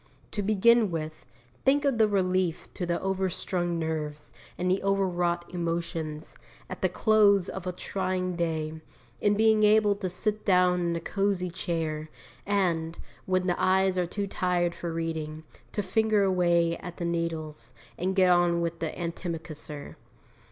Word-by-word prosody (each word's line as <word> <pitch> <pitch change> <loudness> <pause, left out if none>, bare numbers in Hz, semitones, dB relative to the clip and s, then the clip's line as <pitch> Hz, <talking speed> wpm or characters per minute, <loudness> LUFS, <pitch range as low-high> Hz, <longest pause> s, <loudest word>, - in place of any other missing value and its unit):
To 205 - -2
begin 215 +2 +4
with, 155 -6 -5 0.4
think 285 +2 +3
of 270 -5 +1
the 220 - +6
relief 185 -4 0
to 180 - -4
the 170 0 0
overstrung 185 -2 -1
nerves 155 -2 -4 0.2
and 180 +1 0
the 190 - +1
over 195 0 +2
wrought 175 -1 -1
emotions, 165 -3 -3 0.4
at - - -6
the - - +2
close 205 -4 +4
of 190 -1 -6
a - - 0
trying 185 0 -2
day, 160 -2 -2 0.4
in 205 0 +2
being 220 0 +4
able 210 0 +5
to 190 -3 -3
sit 210 +4 -1
down 180 -2 +4
in 170 -1 0
a - - -1
cosy 195 0 -1
chair, 160 -3 -3 0.4
and, 170 -5 0 0.3
when 185 -1 +1
the 175 -1 0
eyes 190 0 +3
are 180 -1 0
too 200 +3 -3
tired 180 -3 0
for 170 -1 -5
reading, 160 -1 -4 0.3
to 205 - -2
finger 215 +1 +2
away 175 -3 +2
at 175 -1 -9
the 170 - -3
needles, 160 -7 -3 0.2
and 185 +2 -1
get 185 -2 +5
on 175 -1 +3
with 170 0 -2
the 165 - -1
antimacassar. 165 -4 -6
180 Hz, 160 wpm, -28 LUFS, 165-195 Hz, 0.4 s, the